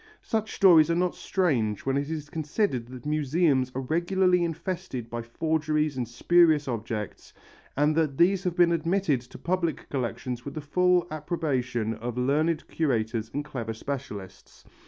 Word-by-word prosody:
Such 220 -1 -2
stories 165 -5 +6
are 170 - +2
not 180 +1 +1
strange 120 - 0
when 135 0 +1
it 140 +1 -1
is 150 -2 -5
considered 155 - -1
that 125 0 -10
museums 150 -3 +1
are 130 - -1
regularly 175 +5 +2
infested 165 -8 -4
by 120 0 -3
forgeries 155 +4 -1
and 125 -2 -2
spurious 155 +4 +3
objects 110 -3 -5 0.4
and 150 +2 +3
that 155 -4 +1
these 185 +2 +3
have 180 -2 0
been 175 -2 +5
admitted 170 -4 +1
to 125 +1 -13
public 170 -2 -2
collections 125 -1 -3
with 140 - -7
the - - -3
full 180 +4 +2
approbation 130 -8 -2
of 120 +2 -5
learned 150 +5 +1
curators 115 -7 -1
and 145 +1 -3
clever 115 -6 -5
specialists. 105 -7 -7
150 Hz, 155 wpm, -27 LUFS, 125-170 Hz, 0.4 s, stories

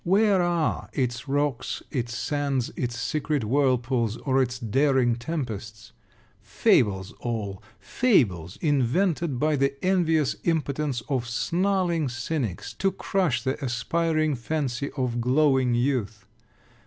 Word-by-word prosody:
Where 195 +1 +3
are 175 -3 0
its 120 0 -2
rocks, 140 -2 -1
its 120 -4 -2
sands, 140 -4 -1
its 120 -2 -3
secret 150 -3 -1
whirlpools, 125 -2 +1
or 135 -1 +1
its 125 -1 -1
daring 130 +1 +2
tempests? 115 -7 -5 0.5
Fables 95 -3 +2
all! 105 -5 -4 0.2
Fables 100 - +1
invented 150 +2 +1
by 150 +3 +2
the 140 0 +1
envious 165 -6 +2
impotence 150 -5 -1
of 125 -2 -2
snarling 175 +2 0
Cynics, 120 - -3
to 195 - +2
crush 185 -9 0
the 130 +1 -2
aspiring 155 +5 0
fancy 135 0 -2
of 120 -2 -1
glowing 130 -1 +3
youth! 120 -5 -1
135 Hz, 115 wpm, -26 LUFS, 120-155 Hz, 0.5 s, Where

